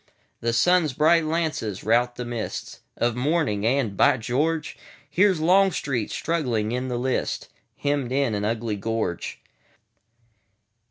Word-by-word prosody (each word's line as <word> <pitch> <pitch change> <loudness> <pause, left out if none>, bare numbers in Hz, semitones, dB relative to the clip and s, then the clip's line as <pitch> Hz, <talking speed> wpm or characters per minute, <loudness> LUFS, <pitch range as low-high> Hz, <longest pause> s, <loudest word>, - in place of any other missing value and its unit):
The 115 - 0
sun's 160 +4 +3
bright 155 +4 +4
lances 155 - -2
rout 120 +2 +2
the 125 - -4
mistsOf 120 0 -4
morning; 125 -5 0
and—By 130 0 +3
George! 150 +8 -1 0.3
Here 185 +8 +4
's 180 - -2
Longstreet, 160 - +2
struggling 125 -10 -1
in 125 +1 -2
the 125 -1 -2
lists, 130 +1 -2 0.3
Hemmed 140 -3 -1
in 135 -3 +1
an 105 0 -2
ugly 110 0 -1
gorge. 110 -4 -3
125 Hz, 120 wpm, -24 LUFS, 115-155 Hz, 0.3 s, bright